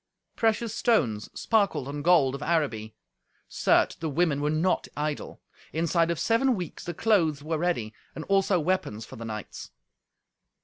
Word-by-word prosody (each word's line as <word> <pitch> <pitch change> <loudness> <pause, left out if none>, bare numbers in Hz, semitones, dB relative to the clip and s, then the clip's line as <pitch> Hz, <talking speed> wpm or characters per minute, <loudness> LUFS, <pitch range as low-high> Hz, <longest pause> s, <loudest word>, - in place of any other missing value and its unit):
Precious 225 -1 +1
stones 120 - +1
sparkled 200 - +1
on 145 +1 -5
gold 155 -5 +4
of 140 - -6
Araby. 135 -10 -1 0.5
Certes, - - +2
the 160 - -4
women 150 -1 +1
were 150 - +1
not 160 +4 +1
idle. 150 0 -4 0.3
Inside 165 +1 +1
of 170 - -1
seven 245 - +2
weeks 180 -5 -6
the 175 - -5
clothes 165 -10 +2
were 155 0 -2
ready, 150 -11 -1 0.2
and 160 - -5
also 195 -1 +2
weapons 150 - -1
for - - -11
the 115 - -7
knights. 110 -2 -7
160 Hz, 150 wpm, -27 LUFS, 140-185 Hz, 0.5 s, gold